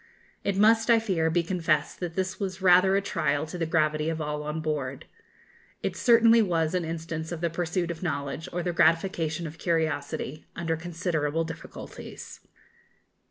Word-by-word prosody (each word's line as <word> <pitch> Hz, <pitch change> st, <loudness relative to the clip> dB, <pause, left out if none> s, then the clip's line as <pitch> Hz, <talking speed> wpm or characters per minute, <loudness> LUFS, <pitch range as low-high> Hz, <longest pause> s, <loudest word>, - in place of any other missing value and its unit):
It 200 Hz, -1 st, 0 dB
must, 225 Hz, +3 st, +4 dB
I 230 Hz, -, +7 dB
fear, 185 Hz, -8 st, +1 dB
be 170 Hz, +1 st, +1 dB
confessed 165 Hz, -4 st, 0 dB
that 175 Hz, -2 st, -4 dB
this 190 Hz, +1 st, -2 dB
was 190 Hz, -2 st, -3 dB
rather 185 Hz, +1 st, +5 dB
a 200 Hz, -, +1 dB
trial 145 Hz, -6 st, 0 dB
to 160 Hz, -, -8 dB
the 165 Hz, -2 st, -1 dB
gravity 155 Hz, -1 st, +1 dB
of 160 Hz, 0 st, -2 dB
all 150 Hz, -1 st, -3 dB
on 150 Hz, +1 st, -3 dB
board. 145 Hz, -4 st, -3 dB, 0.8 s
It -, -, -1 dB
certainly 230 Hz, -1 st, +6 dB
was 165 Hz, -5 st, +1 dB
an 180 Hz, -1 st, 0 dB
instance 160 Hz, 0 st, -4 dB
of 170 Hz, -, -4 dB
the 170 Hz, 0 st, -1 dB
pursuit 175 Hz, +1 st, -1 dB
of 160 Hz, -, -8 dB
knowledge, 145 Hz, -3 st, -3 dB
or 175 Hz, 0 st, -2 dB
the 175 Hz, 0 st, -1 dB
gratification 165 Hz, -1 st, +2 dB
of 160 Hz, +1 st, -8 dB
curiosity, 155 Hz, -3 st, -2 dB
under 165 Hz, -1 st, -1 dB
considerable 165 Hz, -2 st, -1 dB
difficulties. 165 Hz, 0 st, -9 dB
165 Hz, 165 wpm, -27 LUFS, 155-185 Hz, 0.8 s, I